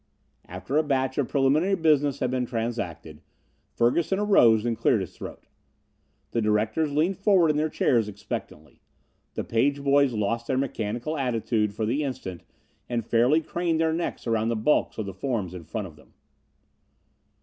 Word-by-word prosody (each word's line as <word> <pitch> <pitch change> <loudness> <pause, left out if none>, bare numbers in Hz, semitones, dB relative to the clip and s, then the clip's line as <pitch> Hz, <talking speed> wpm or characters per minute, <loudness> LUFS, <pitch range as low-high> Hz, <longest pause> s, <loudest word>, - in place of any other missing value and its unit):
After 95 +11 -3
a 155 - +4
batch 135 -2 0
of 135 - +1
preliminary 145 +8 +2
business 145 -5 +2
had 125 - 0
been 125 -1 -1
transacted, 100 -10 -4 0.5
Ferguson 160 +11 +1
arose 120 - +4
and 120 -1 0
cleared 110 -1 +2
his 95 - -7
throat. - - -9 0.9
The 115 - 0
directors 110 +8 +1
leaned 165 +6 0
forward 190 -6 +4
in - - -3
their 155 +1 +1
chairs 115 -7 +1
expectantly. 95 -7 -8 0.5
The - - -2
page 140 +5 0
boys 140 -2 +3
lost 115 +2 -1
their 130 - 0
mechanical 120 +2 -2
attitude 115 -4 0
for 110 - -1
the 135 +7 0
instant 130 - -5 0.5
and 120 -2 -2
fairly 125 +8 +3
craned 170 0 -1
their 160 0 +2
necks 170 +1 -3
around 115 -1 0
the 115 - 0
bulks 110 +7 +1
of 110 - -3
the 95 - -6
forms 100 -3 -3
in 90 -3 -9
front 105 +6 -4
of 80 -5 -11
them. - - -21
120 Hz, 165 wpm, -26 LUFS, 110-145 Hz, 0.9 s, a